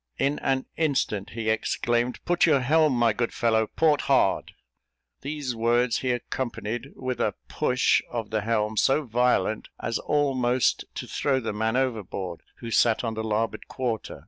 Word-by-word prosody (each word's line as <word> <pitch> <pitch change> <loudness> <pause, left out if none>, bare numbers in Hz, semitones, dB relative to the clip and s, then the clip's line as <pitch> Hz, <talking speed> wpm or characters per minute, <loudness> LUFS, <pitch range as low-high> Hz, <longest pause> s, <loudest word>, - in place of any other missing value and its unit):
In 140 +2 0
an 135 -1 0
instant 135 -10 0
he 110 -1 0
exclaimed, 120 +2 -1
"Put 175 0 +3
your 145 -4 +4
helm, 155 +2 +3
my 120 -2 +3
good 120 +2 -1
fellow, 110 -2 +1
port 155 +2 +2
hard." 130 -8 +2 0.7
These 140 -3 -4
words 120 +1 +2
he 130 - -2
accompanied 120 0 -3
with 130 -1 -4
a - - 0
push 125 0 +2
of 115 -3 -4
the 110 -1 0
helm 110 0 -1
so 140 +6 +3
violent, 120 -3 +1
as 115 - -2
almost 130 -4 +1
to - - -4
throw 135 -2 0
the 115 -4 -3
man 110 +3 0
overboard 100 -9 -2 0.2
who 115 -1 -6
sat 115 0 +3
on 115 -2 -2
the 110 0 -4
larboard 110 +1 -2
quarter. 120 -4 -3
120 Hz, 160 wpm, -26 LUFS, 110-130 Hz, 0.7 s, your